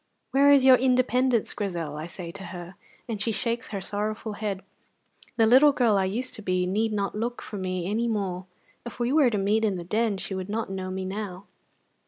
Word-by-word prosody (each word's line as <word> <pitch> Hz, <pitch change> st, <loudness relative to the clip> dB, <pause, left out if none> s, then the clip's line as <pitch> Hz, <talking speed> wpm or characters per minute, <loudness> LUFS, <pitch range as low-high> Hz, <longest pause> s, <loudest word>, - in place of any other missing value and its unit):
'Where 280 Hz, +1 st, +5 dB
is 275 Hz, -2 st, +6 dB
your 260 Hz, -1 st, +8 dB
independence, 255 Hz, -2 st, +2 dB
Grizel?' 170 Hz, -7 st, -3 dB
I 155 Hz, +2 st, -5 dB
say 175 Hz, -1 st, -8 dB
to 195 Hz, +1 st, -9 dB
her, 175 Hz, 0 st, -8 dB, 0.3 s
and 220 Hz, -4 st, -4 dB
she 225 Hz, -, 0 dB
shakes 235 Hz, +3 st, -2 dB
her 200 Hz, -, -4 dB
sorrowful 210 Hz, +2 st, -3 dB
head. 205 Hz, -3 st, -4 dB, 0.7 s
The 225 Hz, -, +5 dB
little 265 Hz, +6 st, +7 dB
girl 235 Hz, -6 st, +3 dB
I 195 Hz, -1 st, +2 dB
used 235 Hz, +7 st, -2 dB
to -, -, -5 dB
be 185 Hz, -2 st, 0 dB
need 215 Hz, +4 st, 0 dB
not 200 Hz, -2 st, -1 dB
look 235 Hz, +3 st, -3 dB
for 210 Hz, -, -7 dB
me 185 Hz, -1 st, -2 dB
any 225 Hz, +4 st, 0 dB
more; 190 Hz, -5 st, -2 dB, 0.4 s
if 240 Hz, -, -9 dB
we 240 Hz, +2 st, 0 dB
were 295 Hz, -5 st, +5 dB
to 215 Hz, -, -1 dB
meet 205 Hz, +3 st, +1 dB
in 205 Hz, -4 st, +1 dB
the 175 Hz, -, -5 dB
Den 215 Hz, +3 st, 0 dB
she 190 Hz, -, -4 dB
would 190 Hz, 0 st, -4 dB
not 220 Hz, -1 st, -2 dB
know 190 Hz, -1 st, -4 dB
me 190 Hz, 0 st, -4 dB
now." 195 Hz, -1 st, -5 dB
210 Hz, 215 wpm, -26 LUFS, 190-235 Hz, 0.7 s, your